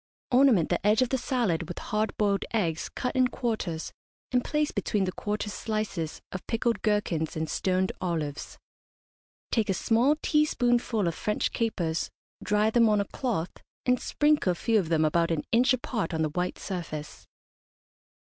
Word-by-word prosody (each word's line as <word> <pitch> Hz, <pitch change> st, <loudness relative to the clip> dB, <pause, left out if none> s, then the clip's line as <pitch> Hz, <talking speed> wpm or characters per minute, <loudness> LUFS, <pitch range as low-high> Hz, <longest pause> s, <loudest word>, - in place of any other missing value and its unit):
Ornament 250 Hz, -, +5 dB
the -, -, 0 dB
edge 210 Hz, +4 st, +4 dB
of 250 Hz, -, -2 dB
the 265 Hz, -, +1 dB
salad 225 Hz, -, 0 dB
with 175 Hz, -, -7 dB
hard 215 Hz, +1 st, -2 dB
boiled 200 Hz, -2 st, +1 dB
eggs 170 Hz, -8 st, 0 dB
cut 250 Hz, -, -3 dB
in 255 Hz, -1 st, +4 dB
quarters, 215 Hz, -10 st, -3 dB, 0.4 s
and 250 Hz, -1 st, +2 dB
place 300 Hz, 0 st, 0 dB
between 200 Hz, 0 st, 0 dB
the 185 Hz, -, -1 dB
quarters 210 Hz, +2 st, -3 dB
slices 215 Hz, -8 st, -3 dB
of 185 Hz, -, -7 dB
pickled 230 Hz, -2 st, 0 dB
gherkins 205 Hz, -7 st, 0 dB
and 160 Hz, 0 st, -2 dB
stoned 185 Hz, +3 st, 0 dB
olives. 160 Hz, -5 st, -3 dB, 0.9 s
Take 220 Hz, -4 st, +1 dB
a 195 Hz, -, +2 dB
small 240 Hz, +9 st, +3 dB
teaspoonful 245 Hz, -, +2 dB
of 170 Hz, -, 0 dB
French 210 Hz, +5 st, -1 dB
capers, 175 Hz, -8 st, -1 dB, 0.3 s
dry 210 Hz, +1 st, +2 dB
them 230 Hz, -1 st, +5 dB
on 210 Hz, -1 st, +3 dB
a 200 Hz, -, +1 dB
cloth, 205 Hz, -8 st, -2 dB, 0.3 s
and 250 Hz, -1 st, +2 dB
sprinkle 295 Hz, -11 st, +2 dB
a -, -, -7 dB
few 225 Hz, +5 st, +2 dB
of 170 Hz, -5 st, -2 dB
them 160 Hz, -2 st, +3 dB
about 165 Hz, +2 st, +2 dB
an 160 Hz, -3 st, 0 dB
inch 240 Hz, +3 st, +4 dB
apart 225 Hz, -9 st, -1 dB
on 160 Hz, -, +1 dB
the 155 Hz, -, 0 dB
white 180 Hz, +3 st, -2 dB
surface. 155 Hz, -5 st, -6 dB
210 Hz, 170 wpm, -28 LUFS, 170-235 Hz, 0.9 s, Ornament